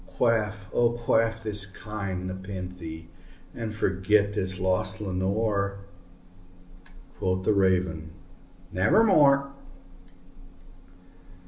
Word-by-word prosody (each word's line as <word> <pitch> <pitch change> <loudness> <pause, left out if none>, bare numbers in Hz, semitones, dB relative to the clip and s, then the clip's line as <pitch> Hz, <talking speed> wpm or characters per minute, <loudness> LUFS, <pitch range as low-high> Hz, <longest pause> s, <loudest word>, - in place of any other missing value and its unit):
Quaff, 105 -3 0
oh 120 -1 +3
quaff 115 -1 0
this 105 -2 +3
kind 100 -2 -5
nepenthé, 90 -3 -7 0.5
and 115 -2 -5
forget 100 +1 +1
this 95 -2 -1
lost 95 0 0
Lenore!" 100 +1 -1 1.4
Quoth 95 0 -1
the 110 - +3
Raven, 90 -5 +1 0.6
"Nevermore." 140 - +4
100 Hz, 80 wpm, -26 LUFS, 95-110 Hz, 1.4 s, Nevermore